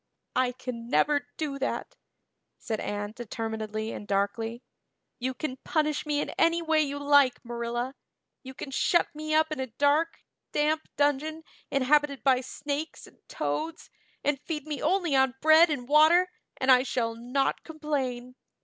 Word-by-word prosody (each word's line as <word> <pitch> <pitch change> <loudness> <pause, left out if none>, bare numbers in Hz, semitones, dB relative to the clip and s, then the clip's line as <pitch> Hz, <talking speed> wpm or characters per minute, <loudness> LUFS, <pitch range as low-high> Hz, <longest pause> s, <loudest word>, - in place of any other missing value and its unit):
"I 255 -1 +2
can 245 -2 -7
never 285 -1 +2
do 285 -3 -3
that," 270 - -3 0.6
said 220 -3 -4
Anne 205 +1 -4
determinedly 220 -1 -4
and 205 - -7
darkly. 225 +4 -1 0.6
"You 255 +1 -2
can 260 -3 -4
punish 300 +1 -1
me 295 -1 +1
in - - -2
any 335 +1 +4
way 320 -2 +2
you 285 -1 -2
like, 285 -3 +3
Marilla. 240 +2 -3 0.5
You 260 0 -10
can 270 - -7
shut 345 +5 +2
me 310 +1 -2
up 315 0 +3
in 310 - -3
a 260 - -2
dark, 285 +7 +1 0.4
damp 310 +1 +1
dungeon 290 +3 +1 0.3
inhabited 280 +1 +2
by 260 -2 +4
snakes 290 +4 -5
and - - -19
toads 325 +2 -3 0.3
and 285 -1 0
feed 300 -2 -4
me 300 -4 -4
only 345 -2 +1
on 265 -1 +3
bread 315 +3 +7
and 265 -5 -3
water 320 +5 +5 0.3
and 260 0 +3
I 250 -1 +7
shall 240 -3 -1
not 250 +4 -1
complain. 270 -6 -3
275 Hz, 155 wpm, -28 LUFS, 245-305 Hz, 0.6 s, bread